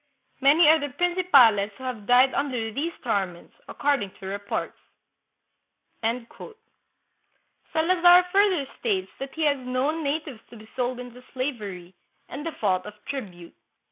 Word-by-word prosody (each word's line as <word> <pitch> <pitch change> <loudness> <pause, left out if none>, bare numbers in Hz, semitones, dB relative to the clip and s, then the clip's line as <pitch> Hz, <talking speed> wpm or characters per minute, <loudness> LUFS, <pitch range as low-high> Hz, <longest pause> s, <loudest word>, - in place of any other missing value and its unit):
Many 300 +4 +6
are 315 +1 +6
the 290 0 -4
prin 355 +6 0
cipales 240 - +5
who 260 - -14
have 235 -6 -6
died 250 +2 +5
under 250 -6 -2
these 310 +8 -2
torments, 195 -7 -3
according 280 -8 -1
to 190 - -10
reports." 200 +1 -4 1.2
Salazar 235 - -5 1.8
further 390 -6 +3
states 195 -5 -1
that 270 0 -7
he 320 - -2
has 285 -2 +2
known 260 +6 -2
natives 285 -4 -3
to 235 - -13
be 215 0 -14
sold 250 0 -2
into 250 0 -10
slavery, 210 -10 -5 0.4
in 280 - -6
default 205 - -1
of 210 - -10
tribute. 185 -11 -7
250 Hz, 135 wpm, -25 LUFS, 210-290 Hz, 1.8 s, Many